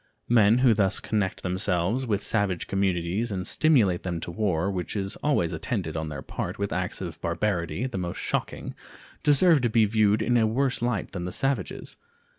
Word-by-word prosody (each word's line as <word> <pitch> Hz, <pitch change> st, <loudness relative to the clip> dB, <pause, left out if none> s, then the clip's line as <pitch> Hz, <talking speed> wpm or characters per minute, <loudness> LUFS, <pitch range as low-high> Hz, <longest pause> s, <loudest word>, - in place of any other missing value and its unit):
Men 115 Hz, -1 st, +5 dB
who 120 Hz, -, +6 dB
thus 100 Hz, -3 st, +1 dB
connect 105 Hz, -4 st, -2 dB
themselves 95 Hz, +6 st, 0 dB
with 105 Hz, -3 st, 0 dB
savage 100 Hz, -5 st, 0 dB
communities 95 Hz, +3 st, -1 dB
and 90 Hz, -2 st, -3 dB
stimulate 115 Hz, -, +3 dB
them 85 Hz, -3 st, -3 dB
to 85 Hz, -, -5 dB
war, 95 Hz, -1 st, 0 dB
which 90 Hz, 0 st, -4 dB
is 95 Hz, -1 st, -2 dB
always 135 Hz, -, 0 dB
attended 95 Hz, -, -3 dB
on 80 Hz, -1 st, -3 dB
their 70 Hz, -3 st, -6 dB
part -, -, -5 dB
with 100 Hz, 0 st, -2 dB
acts 90 Hz, +1 st, -2 dB
of 85 Hz, -4 st, -6 dB
barbarity 85 Hz, +2 st, -1 dB
the 125 Hz, -7 st, -3 dB
most 85 Hz, -1 st, -4 dB
shocking, -, -, -3 dB, 0.5 s
deserve 150 Hz, +1 st, +5 dB
to 120 Hz, -, +1 dB
be 110 Hz, 0 st, +4 dB
viewed 105 Hz, 0 st, +2 dB
in 120 Hz, +2 st, +2 dB
a 110 Hz, -1 st, +3 dB
worse 130 Hz, +3 st, 0 dB
light 120 Hz, -5 st, -1 dB
than 90 Hz, -2 st, -4 dB
the 90 Hz, -, -4 dB
savages. 135 Hz, -6 st, -2 dB
100 Hz, 185 wpm, -26 LUFS, 90-115 Hz, 0.5 s, who